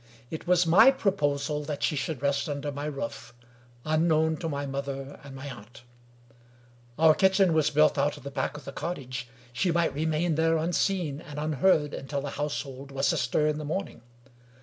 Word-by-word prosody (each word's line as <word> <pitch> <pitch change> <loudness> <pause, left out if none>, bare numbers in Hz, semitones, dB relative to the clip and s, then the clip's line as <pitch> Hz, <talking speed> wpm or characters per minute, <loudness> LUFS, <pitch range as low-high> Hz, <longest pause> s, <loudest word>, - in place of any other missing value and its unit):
It 160 - -6
was 180 0 +4
my 190 +10 +7
proposal 150 - 0
that 145 -1 -4
she 155 - +1
should 145 -1 -3
rest, 140 +1 0
under 145 0 -3
my 145 +1 -5
roof, 140 -5 -5 0.5
unknown 160 0 +2
to 165 - -3
my 140 -1 -3
mother 135 0 -5
and 140 -1 -10
my 135 +2 -7
aunt. 120 -2 -11 1.1
Our 160 0 +6
kitchen 190 0 +3
was 155 -2 +3
built 150 -1 +3
out 145 +2 +1
at - - -13
the 140 - -6
back 150 - -2
of 145 - -12
the - - -6
cottage: 135 -6 -5 0.3
she 175 +8 +1
might 170 0 +1
remain 160 +3 0
there 165 +1 +2
unseen 165 -2 0
and 150 -2 -10
unheard 150 0 +2
until 140 +1 -4
the 140 0 -5
household 140 -2 -4
was 135 0 +1
astir 150 - +1
in 150 0 0
the - - -5
morning. 190 +6 -4
150 Hz, 180 wpm, -28 LUFS, 140-160 Hz, 1.1 s, my